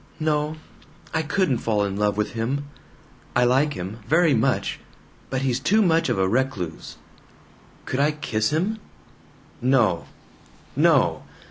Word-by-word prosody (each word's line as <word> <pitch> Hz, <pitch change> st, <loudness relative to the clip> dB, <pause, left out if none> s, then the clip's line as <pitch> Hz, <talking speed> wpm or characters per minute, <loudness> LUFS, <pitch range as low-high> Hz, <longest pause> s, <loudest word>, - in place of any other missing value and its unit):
"No. 155 Hz, 0 st, 0 dB, 0.6 s
I 160 Hz, -, +1 dB
couldn't 155 Hz, -3 st, 0 dB
fall 105 Hz, -2 st, 0 dB
in 100 Hz, -1 st, -3 dB
love 105 Hz, 0 st, 0 dB
with 105 Hz, -, -1 dB
him. 125 Hz, +6 st, -2 dB, 0.7 s
I 125 Hz, -, +4 dB
like 135 Hz, +5 st, +3 dB
him, 95 Hz, +6 st, -6 dB
very 165 Hz, -1 st, +4 dB
much. 110 Hz, -, 0 dB, 0.5 s
But 130 Hz, -, -2 dB
he's 130 Hz, -2 st, +1 dB
too 215 Hz, +10 st, +3 dB
much 165 Hz, -3 st, +2 dB
of -, -, 0 dB
a 95 Hz, -1 st, +2 dB
recluse. 105 Hz, -, -2 dB, 0.9 s
Could 130 Hz, -, -2 dB
I 145 Hz, +2 st, +4 dB
kiss 110 Hz, -8 st, -1 dB
him? 190 Hz, +9 st, -1 dB, 0.8 s
No! 120 Hz, -9 st, +2 dB, 0.7 s
No! -, -, +3 dB
130 Hz, 135 wpm, -24 LUFS, 110-150 Hz, 0.9 s, I